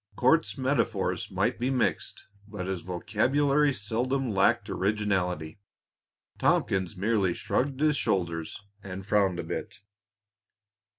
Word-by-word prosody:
Court's 150 +4 +2
metaphors 130 -7 0
might - - 0
be 125 +2 0
mixed, 130 -2 -1 0.2
but 105 -3 -6
his 95 -2 -3
vocabulary 135 - +1
seldom 125 +3 -1
lacked 95 -1 +2
originality. 95 -5 -1 0.8
Tompkins 95 0 +1
merely 100 -3 +1
shrugged 135 +1 -1
his 150 -1 +3
shoulders 85 -6 -1 0.2
and 95 0 -7
frowned 100 -3 +2
a - - -3
bit. - - -5
105 Hz, 110 wpm, -28 LUFS, 95-130 Hz, 0.8 s, his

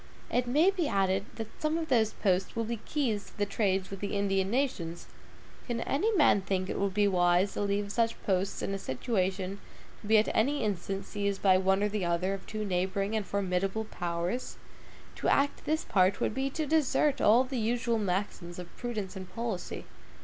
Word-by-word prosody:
It 245 0 +1
may 305 +10 +4
be 360 -6 -1
added 195 -3 +1
that 220 -1 -8
some 310 +1 +1
of 325 -1 -3
those 225 -4 +3
posts 190 0 0
will 230 - 0
be 230 +1 -3
keys 235 -9 -1
to - - -17
the 205 - +1
trade 195 -2 0
with 195 - -7
the 205 +1 -3
Indian 195 -1 +1
nations. 200 -10 -1 0.6
Can 235 -2 -2
any 330 - +1
man 295 - +5
think 185 -1 -1
it - - -3
would 200 -1 0
be 205 -1 +4
wise 180 0 +3
to - - -3
leave 200 0 0
such 230 +1 0
posts 190 0 0
in 195 - -1
a 195 - -3
situation 190 - -2 0.4
to 205 - -9
be 220 +1 +6
at 215 - +4
any 280 +6 +2
instant 195 -1 -2
seized 200 -1 -2
by 185 -2 +6
one 190 +1 +2
or - - +3
the 210 -2 -2
other 175 +2 0
of 195 - -7
two 215 0 -3
neighboring 195 +2 -1
and 210 -3 -1
formidable 195 +2 -1
powers? 175 +5 -3 0.6
To - - -2
act 285 +1 +2
this 315 +1 0
part 190 0 +3
would - - 0
be 265 +3 -1
to 310 +3 -2
desert 295 -1 +2
all 230 +4 +6
the 260 -1 -3
usual 235 +1 0
maxims 185 -3 -2
of 180 -1 -9
prudence 215 -6 -4
and 185 -1 -8
policy. 230 -5 -4
205 Hz, 200 wpm, -30 LUFS, 190-235 Hz, 0.6 s, be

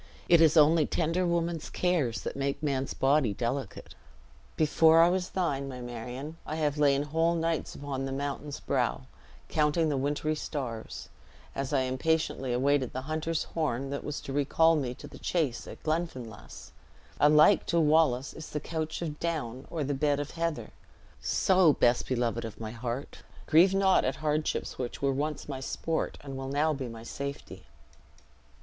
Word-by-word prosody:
It 170 -1 +6
is 160 0 +5
only 155 0 +5
tender 170 +2 0
woman's 170 -1 -1
cares 160 -11 0
that - - -5
make 140 +2 -2
man's 135 -2 -1
body 135 -6 +2
delicate. 125 +4 -4 0.6
Before 160 +1 +5
I 170 +1 +7
was 180 0 -1
thine, 140 -7 -1
my 130 -1 -7
Marion, 125 +6 -6
I 155 - -5
have 150 -2 -1
lain 140 -1 +4
whole 165 +3 +1
nights 165 -2 -1
upon 135 -2 -4
the 135 - -4
mountain's 140 +1 -4
brow, - - 0 0.5
counting 155 +1 +2
the 145 - 0
wintery 145 +3 0
stars, 130 -7 -5 0.4
as 135 -1 -3
I 140 -2 +2
impatiently 130 0 0
awaited 135 +1 +1
the 130 - -3
hunter's 155 +2 -2
horn 140 -4 -2
that 140 - -4
was 150 - -4
to 135 - -6
recall 160 +3 +3
me 130 -5 -2
to - - -11
the - - -12
chase 150 -9 -1
in - - -8
Glenfinlass. 155 - -4 0.5
Alike 150 +6 +5
to 170 - +2
Wallace 150 -4 +3
is 155 - -9
the 150 - -3
couch 160 +2 -4
of 150 -2 -5
down 140 -7 -3
or 160 -3 -2
the 145 +1 -1
bed 145 +1 +1
of 145 0 -4
heather; 165 -2 -3 0.5
so, 185 -5 +4
best 120 -2 +2
beloved 120 -2 -1
of 110 -1 -7
my 110 -1 -5
heart, 120 +3 -5 0.2
grieve 180 +5 +5
not 195 -1 +4
at 130 - 0
hardships 150 -2 -2
which 125 -2 -4
were 135 -1 +2
once 150 +3 -3
my 135 -2 -4
sport, 160 +4 -2
and 135 -2 -7
will 135 0 -5
now 150 +3 +1
be 135 -3 -4
my 115 -1 -9
safety." 140 +4 -7
145 Hz, 170 wpm, -29 LUFS, 135-160 Hz, 0.6 s, I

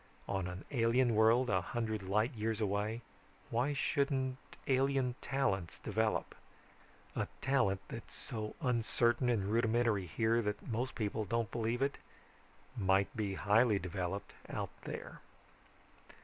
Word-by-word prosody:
On 95 -2 -1
an 90 +1 -7
alien 120 -1 +3
world 115 +4 +5
a 95 -2 +3
hundred 110 0 -2
light 105 +7 +1
years 110 0 -1
away, 105 +2 -1 0.5
why 125 +5 +1
shouldn't 135 -2 0 0.3
alien 135 -1 +2
talents 100 -11 0
develop? 110 +1 0 0.8
A - - 0
talent 115 -8 +2
that's - - -8
so 110 -2 -5
uncertain 120 0 +2
and 110 -5 +2
rudimentary 115 -2 +2
here 115 +6 +2
that 105 -2 -3
most 125 +3 -2
people 110 -1 -1
don't 115 +1 -1
believe 120 +2 0
it, 140 - -1 0.8
might 95 -3 +2
be 100 -3 -1
highly 105 +3 +4
developed 95 +1 -3 0.2
out - - -3
there. - - -6
115 Hz, 125 wpm, -35 LUFS, 100-125 Hz, 0.8 s, world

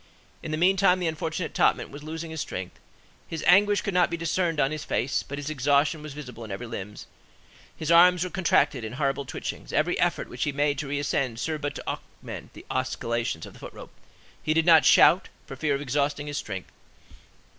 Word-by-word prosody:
In - - -6
the 155 - -1
meantime, 185 +1 +4
the 180 - -2
unfortunate 160 +1 -3
topman - - +2
was 145 +1 -9
losing 160 +2 -6
his 160 -2 -4
strength; 90 -1 -6 0.5
his 160 -1 -5
anguish 205 +2 +5
could 200 - -3
not 180 -1 +3
be 170 - -3
discerned 165 -1 0
on 135 - +2
his 155 -1 -4
face, 135 -2 0
but 140 - -7
his 145 +1 -4
exhaustion 145 +2 +2
was 150 -2 -8
visible 125 -6 -8
in 110 - -9
every 100 +5 -5
limb; 105 -3 -6 0.8
his 160 +1 -2
arms 180 +1 +6
were 185 - -4
contracted 170 -8 +2
in 110 +1 -5
horrible 140 +1 -1
twitchings; - - -6
every - - +1
effort - - +1
which - - -4
he 150 - 0
made 145 +1 0
to 150 - -4
re 145 +1 -2
ascend 135 -4 -1
served 155 +1 -2
but 145 0 -3
to - - -8
augment - - -7
the - - -13
oscillations 115 -8 -2
of - - -12
the - - -15
foot - - -9
rope; - - -11 0.5
he 155 0 0
did 165 0 +3
not 165 -2 +7
shout, 180 - +6 0.2
for 135 - -8
fear 145 +1 0
of 140 - -4
exhausting 145 +1 -1
his 145 -1 -3
strength. 95 -4 -6
150 Hz, 210 wpm, -26 LUFS, 135-165 Hz, 0.8 s, not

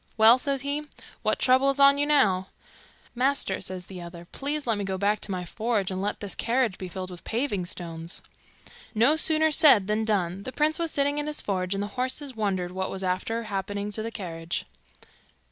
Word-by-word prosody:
'Well,' 225 +3 +7
says 275 0 0
he, 290 +2 -2 0.3
'what - - +1
trouble 260 +2 +4
is 275 0 0
on 280 0 +7
you 290 - +1
now?' 195 -11 +3 0.7
'Master,' 255 -5 +1
says 185 -1 -7
the 185 -1 -9
other, 170 0 -9
'please 290 +2 -3
let 225 -4 0
me - - -2
go 190 -1 -2
back 205 +2 +1
to - - -5
my 180 -1 -3
forge, 215 0 -1
and 185 0 -3
let 205 +1 -2
this 205 -2 -2
carriage 235 -4 0
be 185 - -5
filled 185 +1 -6
with 175 - -10
paving 220 -7 -1
stones.' 165 -1 -6 0.7
No 240 +8 +5
sooner 315 0 +4
said 275 -10 +6
than 210 +2 0
done. 195 -4 0
The 260 +5 -7
prince 310 +2 +1
was 335 -1 0
sitting 285 0 +1
in 295 - -3
his 300 0 -2
forge, 185 -1 -1
and 200 - -1
the 205 +4 -8
horses 260 +1 -3
wondered 190 -5 -1
what 190 +1 -3
was 195 0 -4
after 190 +5 -1
happening 205 0 -3
to 215 - -3
the 225 - -3
carriage. 170 -6 -5
210 Hz, 205 wpm, -26 LUFS, 185-275 Hz, 0.7 s, Well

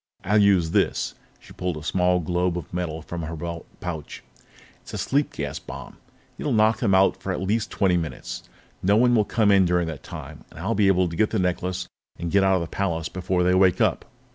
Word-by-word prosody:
I'll 105 +3 +3
use 95 -5 +4
this - - +1
" - - -34
She - - -15
pulled 90 -3 -3
a 75 - -8
small 90 +3 +2
globe 90 +1 0
of 85 - -8
metal 80 -3 -3
from 85 0 -5
her 80 +1 -5
belt 85 +1 -6
pouch. 80 -4 -6 0.6
"It's - - -9
a - - -3
sleep 140 +2 0
gas 70 -2 -4
bomb. - - -9 0.4
It'll 150 - -1
knock 110 0 +3
them 100 -6 +3
out 95 0 +3
for 95 - -3
at 90 - -2
least 105 +4 0
twenty 90 -3 +2
minutes. 80 -3 -5 0.4
No 100 +3 +3
one 120 +1 +4
will 110 -3 +4
come 105 0 +2
in 100 -1 +6
during 90 -1 +2
that 75 -4 -7
time, - - -9
and - - -16
I'll 100 +7 -1
be 105 -3 +3
able 95 -2 +3
to 85 - -6
get 105 +5 +2
the 110 - -1
necklace 90 0 -1 0.3
and 85 -1 -4
get 100 -1 +4
out 95 0 +4
of 90 - 0
the 85 - -3
palace 85 -5 -1
before 90 -1 -1
they 90 +1 +3
wake 95 -1 +4
up." - - +1
90 Hz, 230 wpm, -24 LUFS, 85-100 Hz, 0.6 s, in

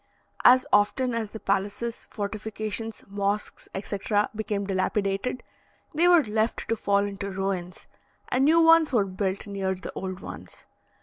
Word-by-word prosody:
As 255 +1 +7
often 245 +5 +3
as 225 -2 -2
the 220 - -8
palaces, 200 +4 -2
fortifications, 215 +1 -4
mosques, 200 +1 -3
etc., 205 +1 -1
became 210 -2 -2
dilapidated, 195 +4 -1 0.5
they 335 +4 +3
were 350 -3 +6
left 220 0 -1
to 230 - +2
fall 200 -2 +1
into 200 0 -5
ruins, 190 -2 -3 0.4
and 255 +2 +2
new 320 +4 +5
ones 325 -2 +6
were 225 -6 +3
built 190 0 -3
near 195 -2 -2
the 185 - -8
old 185 -1 -5
ones. - - -10
205 Hz, 140 wpm, -26 LUFS, 195-230 Hz, 0.5 s, As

